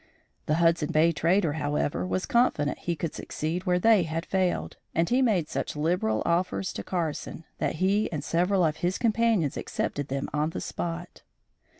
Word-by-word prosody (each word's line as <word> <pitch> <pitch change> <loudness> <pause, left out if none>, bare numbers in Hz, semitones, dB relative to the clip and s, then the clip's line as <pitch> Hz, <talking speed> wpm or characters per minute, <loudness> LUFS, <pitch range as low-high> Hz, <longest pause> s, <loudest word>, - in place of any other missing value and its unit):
The 150 - +2
Hudson 165 -2 +2
Bay 160 +2 +4
trader, 165 +1 +2
however, 145 - -1
was 95 0 -1
confident 195 -12 +1
he 170 - -2
could 160 0 -4
succeed 170 +5 -4
where 180 0 +3
they 215 +2 +5
had 165 +1 -3
failed, 185 -2 -1 0.2
and 165 +1 +2
he 250 +2 +2
made 200 -11 +2
such - - -3
liberal 150 -9 0
offers 180 +2 0
to - - -5
Carson 165 -2 -3 0.2
that - - -1
he 195 +5 +1
and 150 -4 -3
several 180 +4 +2
of 155 -1 0
his 180 +1 -1
companions 225 - +2
accepted 145 -1 -3
them 135 0 -2
on 150 +1 +1
the - - -5
spot. 175 +1 -5
170 Hz, 175 wpm, -27 LUFS, 150-185 Hz, 0.2 s, they